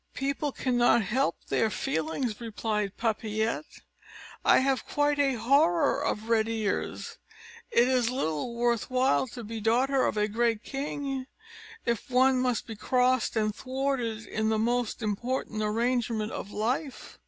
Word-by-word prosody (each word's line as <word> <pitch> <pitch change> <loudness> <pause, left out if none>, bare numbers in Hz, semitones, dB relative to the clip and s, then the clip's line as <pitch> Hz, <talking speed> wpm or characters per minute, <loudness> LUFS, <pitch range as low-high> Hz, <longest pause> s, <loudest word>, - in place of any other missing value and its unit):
"People 280 +1 -1
cannot 245 -3 +2
help 220 -3 +1
their 225 - +2
feelings," 205 - -2
replied 210 -3 -2
Papillette; 220 +4 -2 0.6
"I - - +6
have 265 0 +1
quite 290 0 +1
a 275 -2 +3
horror 285 +5 +3
of 220 -5 -2
red 225 -1 +2
ears; 220 -3 -3 0.5
it 240 +1 +4
is 250 -3 +2
little 235 - -2
worth 235 0 0
while 260 +1 +2
to 240 0 -8
be 220 +1 -6
daughter 255 +5 +2
of - - -2
a 210 0 +2
great 225 0 0
king, 275 -1 -4 0.6
if 235 +3 -1
one 255 0 +4
must 250 -2 0
be 225 - -7
crossed 250 +2 +1
and 215 -1 +1
thwarted 255 -3 -2
in 220 +1 -1
the 220 - +1
most 240 +1 0
important 215 +1 -2
arrangement 225 0 0
of - - -6
life." 250 +7 -3
235 Hz, 140 wpm, -28 LUFS, 220-260 Hz, 0.6 s, I